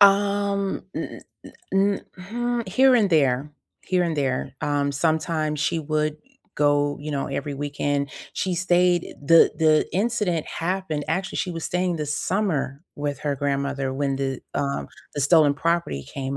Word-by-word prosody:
Um, 200 Hz, 0 st, +3 dB
n -, -, -5 dB, 0.2 s
n -, -, -11 dB, 0.2 s
n 195 Hz, +1 st, +2 dB
mm 235 Hz, +4 st, -3 dB
here 260 Hz, +7 st, +5 dB
and 220 Hz, -5 st, +4 dB
there, 140 Hz, -2 st, +2 dB, 0.3 s
here 180 Hz, -1 st, +1 dB
and 165 Hz, -2 st, -1 dB
there. 135 Hz, -2 st, -1 dB
Um, 145 Hz, -1 st, 0 dB
sometimes 155 Hz, 0 st, 0 dB
she 165 Hz, -, +1 dB
would, 155 Hz, 0 st, 0 dB
eh, -, -, -21 dB, 0.4 s
go, 145 Hz, 0 st, +2 dB
you 150 Hz, +1 st, -5 dB
know, 140 Hz, -1 st, -1 dB
every 140 Hz, +1 st, -3 dB
weekend. 145 Hz, 0 st, -1 dB, 0.2 s
She 185 Hz, -2 st, -1 dB
stayed 180 Hz, 0 st, +2 dB
the 165 Hz, +3 st, +6 dB
the 155 Hz, -1 st, +4 dB
incident 200 Hz, -5 st, 0 dB
happened 170 Hz, -4 st, -2 dB
actually, 190 Hz, +5 st, -1 dB
she 185 Hz, -, -1 dB
was 165 Hz, -1 st, -5 dB
staying 180 Hz, -1 st, 0 dB
the 150 Hz, -1 st, -3 dB
summer 150 Hz, -3 st, -1 dB
with 145 Hz, -1 st, -3 dB
her 145 Hz, -2 st, -1 dB
grandmother 140 Hz, -1 st, -1 dB
when 135 Hz, 0 st, -1 dB
the, 135 Hz, -1 st, -2 dB
um, 140 Hz, -, -1 dB, 0.3 s
the 145 Hz, -, -2 dB
stolen 145 Hz, 0 st, +5 dB
property 165 Hz, -, -1 dB
came 135 Hz, 0 st, -4 dB
155 Hz, 160 wpm, -24 LUFS, 140-185 Hz, 0.4 s, the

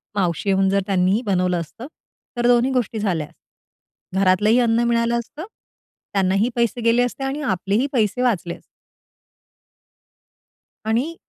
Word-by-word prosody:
मावशी 185 Hz, 0 st, -1 dB
येऊन 195 Hz, 0 st, +3 dB
जर 195 Hz, 0 st, +2 dB
त्यांनी 190 Hz, +3 st, +2 dB
बनवलं 180 Hz, -3 st, +1 dB
असतं, 225 Hz, -, -9 dB, 0.5 s
तर 240 Hz, -, +1 dB
दोन्ही 245 Hz, +2 st, +3 dB
गोष्टी 235 Hz, -3 st, -1 dB
झाल्या. 170 Hz, -8 st, -1 dB, 0.9 s
घरातलंही 195 Hz, +5 st, +3 dB
अन्न 235 Hz, 0 st, +2 dB
मिळालं 235 Hz, 0 st, +1 dB
असतं, 295 Hz, +8 st, -8 dB, 0.7 s
त्यांनाही 195 Hz, +4 st, +2 dB
पैसे 235 Hz, 0 st, 0 dB
गेले 230 Hz, +2 st, +3 dB
असते 245 Hz, +2 st, -4 dB
आणि 275 Hz, +3 st, -3 dB
आपलेही 205 Hz, +2 st, 0 dB
पैसे 220 Hz, 0 st, +1 dB
वाचले 195 Hz, -8 st, 0 dB
असते." -, -, -18 dB, 2.2 s
आणि 250 Hz, +10 st, 0 dB
220 Hz, 130 wpm, -21 LUFS, 190-240 Hz, 2.2 s, येऊन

